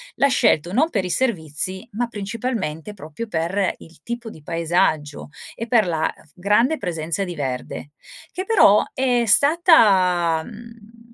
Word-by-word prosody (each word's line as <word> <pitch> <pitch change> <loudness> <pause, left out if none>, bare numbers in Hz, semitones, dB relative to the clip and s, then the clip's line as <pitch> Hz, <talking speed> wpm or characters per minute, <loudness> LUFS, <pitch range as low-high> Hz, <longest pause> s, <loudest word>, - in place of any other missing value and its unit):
l'ha 280 - +3
scelto 175 - +1
non 310 +7 +2
per 200 - -2
i 180 - -4
servizi, 185 - -2
ma 240 +3 -2
principalmente 210 - -5
proprio 185 +4 -8
per 180 +3 -1
il 165 -2 -17
tipo 235 -1 -6
di 160 -8 -14
paesaggio 160 -3 -1 0.3
e 230 - -5
per 225 -4 +3
la 160 -1 -1 0.2
grande 210 - +1
presenza 170 - -3
di 175 -2 -6
verde, 130 0 -5 0.4
che 370 - -4
però 380 - +5
è 250 -2 +1
stata, 200 - +4
mhmm, 230 +1 -14
200 Hz, 140 wpm, -21 LUFS, 165-235 Hz, 0.4 s, però